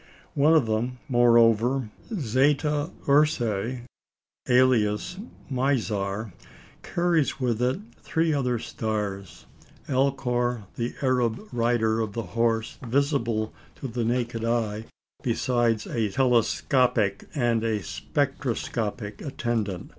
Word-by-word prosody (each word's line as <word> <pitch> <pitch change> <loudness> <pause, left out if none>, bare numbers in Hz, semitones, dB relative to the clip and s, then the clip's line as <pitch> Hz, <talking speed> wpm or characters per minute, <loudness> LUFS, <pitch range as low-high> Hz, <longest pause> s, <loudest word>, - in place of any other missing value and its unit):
One 150 +3 +4
of 150 -6 +4
them, 115 +3 -1
moreover, 120 -1 +4 0.2
Zeta 145 - +1 0.2
Ursæ, 125 -5 +2 0.7
alias 125 - +3 0.3
Mizar, 110 - -1 0.5
carries 170 -5 0
with 120 -3 0
it 130 +10 +1 0.2
three 160 0 +1
other 125 -4 0
stars 105 -4 -4 0.4
Alcor, 125 -3 0
the 120 0 -3
Arab 125 -4 +1
"Rider" 115 -2 +1
of 110 -2 -2
the 115 - -3
horse, 115 -1 0
visible 120 -4 0 0.2
to 135 - -6
the 120 0 -2
naked 120 -1 -1
eye, 115 -2 -1 0.4
besides 120 -2 +1
a 110 -3 -1
telescopic 120 -3 +2
and 120 -4 +1
a 110 -3 -1
spectroscopic 120 -7 -2
attendant. 120 - -3
120 Hz, 100 wpm, -26 LUFS, 110-135 Hz, 0.7 s, One